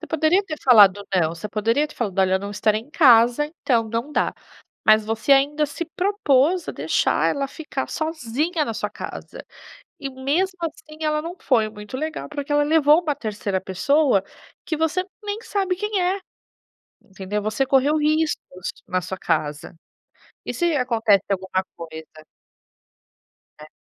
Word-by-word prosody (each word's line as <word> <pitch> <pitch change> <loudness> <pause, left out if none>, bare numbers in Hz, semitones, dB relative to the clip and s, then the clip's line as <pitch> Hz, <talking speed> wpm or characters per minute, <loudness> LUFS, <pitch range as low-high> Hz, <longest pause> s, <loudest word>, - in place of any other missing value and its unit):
Você 325 - -8
poderia 320 +5 +2
ter 310 -5 -5
falado 205 -5 +6
não, 165 -4 +2
você 170 +5 -7
poderia 230 +9 +1
ter - - -15
falado: 200 -6 -3
"Olha, 190 -1 +3
eu - - +3
não 200 +1 -6
estarei 215 +1 +1
em 245 +6 -18
casa, 245 -2 +5 0.2
então 230 -4 +1
não 235 +7 -3
dá." - - +1 0.6
mas 215 0 +6
você 225 +5 +1
ainda 290 +2 +3
se 290 +4 -5
propôs 360 -4 +2
a - - -2
deixar - - +1
ela 275 -1 -2
ficar 290 -4 -5
sozinha 315 +1 -2
na 230 - -3
sua 210 - -2
casa, - - -8 0.6
e 275 - -4
mesmo 310 +9 -1
assim, 310 -1 -6
ela 305 0 0
não 335 +2 -6
foi 225 -5 +2
muito 210 +2 -8
legal, 315 +3 -4
porque 290 -1 -5
ela 290 0 +4
levou 300 +1 +4
uma 305 -4 -1
terceira 205 -3 -3
pessoa 225 - +2 0.4
que 320 - -1
você 320 +4 0 0.2
nem 410 +1 -3
sabe 385 -4 -1
quem 415 0 -1
é. 370 +2 +1 0.8
Entendeu, 195 +1 -5
você 215 +5 0
correu 275 +3 +3
riscos 305 - -1 0.2
na 185 0 -1
sua 190 +2 -6
casa, 150 -1 -2 0.7
e - - -3
se 345 -3 0
acontece 225 -6 +2
alguma 190 -1 -1
coisa. 160 -1 -10 1.4
É. 150 - -11
270 Hz, 160 wpm, -22 LUFS, 210-310 Hz, 1.4 s, falado